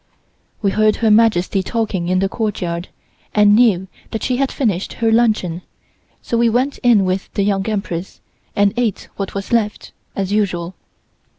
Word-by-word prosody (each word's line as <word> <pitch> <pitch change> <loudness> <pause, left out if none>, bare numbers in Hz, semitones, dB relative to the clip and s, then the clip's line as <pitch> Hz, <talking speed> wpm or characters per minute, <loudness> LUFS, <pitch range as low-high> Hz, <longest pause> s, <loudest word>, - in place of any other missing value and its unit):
We 200 - +2
heard 215 +1 +3
Her 225 -2 +2
Majesty 210 -3 +3
talking 200 -4 -2
in 185 +1 +1
the 195 +1 +2
courtyard, 185 -5 -3 0.5
and 210 -1 +6
knew 210 -6 +3 0.2
that 220 - -4
she 250 - 0
had 275 0 0
finished 205 -8 -1
her 225 -1 0
luncheon, 215 -7 +1 0.6
so 235 - -1
we 235 0 +4
went 255 +5 0
in 230 -6 +4
with 185 +1 -2
the 200 - +1
Young 195 +1 0
Empress, 195 -4 -4 0.4
and 200 -1 +3
ate 235 -5 -1
what 195 -1 -4
was 200 +3 -4
left, 215 -3 0 0.2
as 195 -1 -2
usual. 185 -4 -1
205 Hz, 165 wpm, -18 LUFS, 190-225 Hz, 0.6 s, and